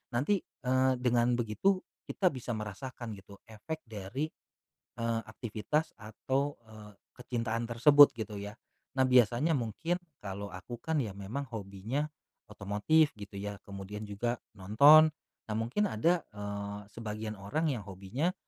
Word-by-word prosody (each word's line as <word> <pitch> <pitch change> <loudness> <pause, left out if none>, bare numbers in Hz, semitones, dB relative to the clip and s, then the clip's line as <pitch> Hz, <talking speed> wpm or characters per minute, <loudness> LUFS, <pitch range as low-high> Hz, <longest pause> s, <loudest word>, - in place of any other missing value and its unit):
Nanti, 150 +11 +2
eee, 130 0 +1
dengan 120 -1 +2
begitu 120 - +1 0.3
kita 190 -3 +2
bisa 125 -1 -7
merasakan 110 +3 -6
gitu 100 0 -12
efek 115 +9 -6
dari, 110 +6 -4 0.7
eee, 115 -1 0
aktivitas 115 - -2
atau, 135 +6 -2
eee, 110 -1 -12 0.2
kecintaan 115 -2 -2
tersebut 145 +5 +8
gitu 110 -1 -4
ya. 105 +3 -7 0.4
Nah, 130 - +5
biasanya 125 +5 +4
mungkin, 135 - -1 0.2
kalau 100 0 -6
aku 90 +7 -8
kan 160 -1 0
ya 110 -8 -2
memang 110 +9 -5
hobinya 110 +8 -3 0.4
otomotif 105 +11 +2
gitu 100 -1 -9
ya, 100 0 -5
kemudian 100 +1 -7
juga 120 +4 -1 0.2
nonton, 140 +12 +8 0.4
nah 110 - -3
mungkin 125 - +1
ada, 165 +10 +2
eee, 100 0 -5
sebagian 110 -1 -5
orang 150 +11 -1
yang 120 -6 -2
hobinya 100 - -2
115 Hz, 135 wpm, -31 LUFS, 105-135 Hz, 0.7 s, tersebut